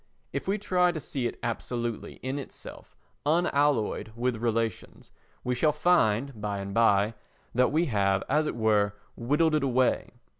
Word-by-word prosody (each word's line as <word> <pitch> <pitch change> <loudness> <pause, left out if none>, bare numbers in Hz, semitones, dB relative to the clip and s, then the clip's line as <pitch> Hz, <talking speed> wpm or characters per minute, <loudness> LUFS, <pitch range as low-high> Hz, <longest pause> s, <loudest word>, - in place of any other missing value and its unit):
If - - -3
we 195 +2 +1
try 180 -3 +2
to 165 - -4
see 135 -4 -2
it - - -6
absolutely 120 0 -3
in 130 +2 -2
itself, 135 - -11 0.3
unalloyed 145 -8 +1
with 120 0 -1
relations, 115 -2 -2 0.3
we 125 - 0
shall 150 +5 +2
find, 140 -7 +2
by 105 -1 -2
and 100 0 -5
by, 105 -1 +3 0.4
that 125 +1 +3
we 160 +4 +2
have, 100 - +1
as 150 +2 +2
it - - -3
were, 105 -3 +2 0.2
whittled 150 +7 +1
it 155 -2 +2
away. 130 -1 +1
125 Hz, 155 wpm, -28 LUFS, 110-150 Hz, 0.4 s, by